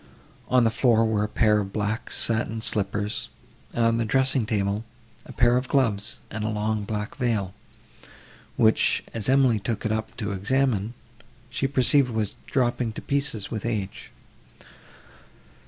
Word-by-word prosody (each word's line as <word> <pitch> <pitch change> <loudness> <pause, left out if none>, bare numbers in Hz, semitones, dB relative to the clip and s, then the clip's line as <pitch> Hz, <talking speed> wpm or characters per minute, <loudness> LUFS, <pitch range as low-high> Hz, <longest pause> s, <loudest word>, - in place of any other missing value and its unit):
On 125 -1 +4
the 115 - +3
floor 115 -1 +3
were 110 -2 +1
a - - -1
pair 105 -1 +3
of 100 -1 -4
black 105 +2 -2
satin 110 -1 +1
slippers, 105 -1 -1 0.4
and, 115 - +1
on 115 0 +2
the - - +1
dressing 130 0 +1
table, 100 0 -1 0.4
a - - -9
pair 120 0 +3
of 125 0 -2
gloves 115 -6 0
and 110 -1 -4
a 110 - -1
long 105 0 -1
black 105 +3 -4
veil, 110 -8 -1 1.0
which, 110 -1 +3
as 115 0 -2
Emily 130 -4 +4
took 110 +2 -3
it 110 - 0
up 110 0 -3
to 105 -4 -3
examine, 110 +2 0 0.6
she 135 - 0
perceived 135 0 +4
was 110 -3 -2
dropping 120 -3 0
to - - -7
pieces 140 -7 -1
with 110 -3 -4
age. 105 -4 -4
110 Hz, 155 wpm, -25 LUFS, 105-125 Hz, 1.0 s, On